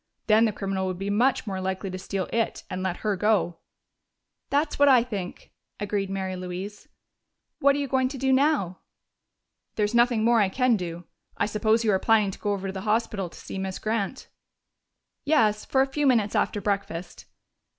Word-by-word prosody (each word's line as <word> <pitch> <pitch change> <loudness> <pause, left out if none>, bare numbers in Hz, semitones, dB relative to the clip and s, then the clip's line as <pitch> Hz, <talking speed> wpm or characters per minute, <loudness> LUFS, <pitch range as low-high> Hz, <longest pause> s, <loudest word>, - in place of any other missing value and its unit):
Then 220 +1 +5
the 220 - +1
criminal 195 -2 -2
would 185 -1 -3
be 195 +2 -3
much 245 +6 +2
more 190 -3 -3
likely 190 +1 -3
to 185 - -5
steal 190 0 -3
it 230 -1 -1
and 185 0 -3
let 185 -1 -3
her 210 -1 +2
go." 190 -4 +1 0.9
"That's 290 +1 0
what 285 - +6
I 250 -3 +6
think," 200 -7 -6 0.3
agreed 205 -1 -2
Mary 190 -1 -3
Louise.... 185 +3 -7 0.7
"What 280 0 +4
are - - -1
you 285 -1 -1
going 260 0 +2
to 270 +1 -6
do 265 +1 +2
now?" 260 - +2 1.0
"There's 210 +1 0
nothing 235 -2 +3
more 230 0 +4
I 195 - +2
can 250 +3 +2
do. 175 -3 -5 0.3
I - - +2
suppose 215 +2 +1
you 220 - +3
are 190 - +2
planning 215 -3 +3
to - - -11
go 205 - -1
over 195 -1 -4
to - - -5
the 190 - -5
hospital 210 -3 -1
to - - -15
see 195 - -6
Miss 190 -1 -3
Grant?" 220 +2 -3 1.0
"Yes, 220 -9 +2
for 265 - +2
a 270 - -6
few 295 -1 +1
minutes 225 -5 +3
after 210 - +1
breakfast. 195 -3 -3
210 Hz, 190 wpm, -26 LUFS, 190-235 Hz, 1.0 s, what